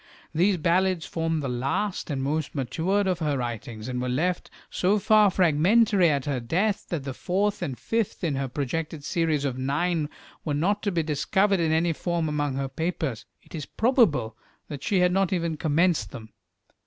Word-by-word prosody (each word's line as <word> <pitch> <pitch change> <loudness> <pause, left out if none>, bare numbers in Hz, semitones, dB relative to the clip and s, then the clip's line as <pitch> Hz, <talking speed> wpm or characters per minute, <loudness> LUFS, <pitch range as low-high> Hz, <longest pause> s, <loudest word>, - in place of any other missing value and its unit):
These 185 +4 +3
ballads 175 0 +1
form 165 +1 -1
the 140 - -3
last 135 +13 -2
and 135 -3 -2
most 150 +2 -2
matured 175 +9 0
of 185 -2 0
her 150 -4 0
writings, 115 -2 -5
and 125 -1 -3
were 125 - -2
left 170 +8 -1 0.2
so 195 +3 +2
far 210 +1 +5
fragmentary 185 +3 +4
at 140 -3 0
her 140 -3 -1
death 190 - -1
that 165 -6 -3
the 135 -1 -4
fourth 200 +8 -1
and 140 -8 -3
fifth 225 -5 -2
in 160 -4 +1
her 135 0 -2
projected 145 +4 -3
series 155 -3 0
of 130 -2 -2
nine 150 +4 0 0.3
were 150 -3 -1
not 200 +8 +1
to 205 - -1
be 170 -3 0
discovered 190 +6 +1
in 165 -2 +1
any 165 +1 +2
form 170 0 -1
among 145 -2 -1
her 135 0 -2
papers. 155 -4 -3 0.2
It - - -19
is 155 -4 -5
probable 210 - +2 0.3
that 145 -3 -6
she 190 +2 +1
had 180 0 +4
not 195 0 +1
even 170 -3 -1
commenced 155 - +1
them. 110 +3 -10
160 Hz, 185 wpm, -26 LUFS, 140-185 Hz, 0.3 s, far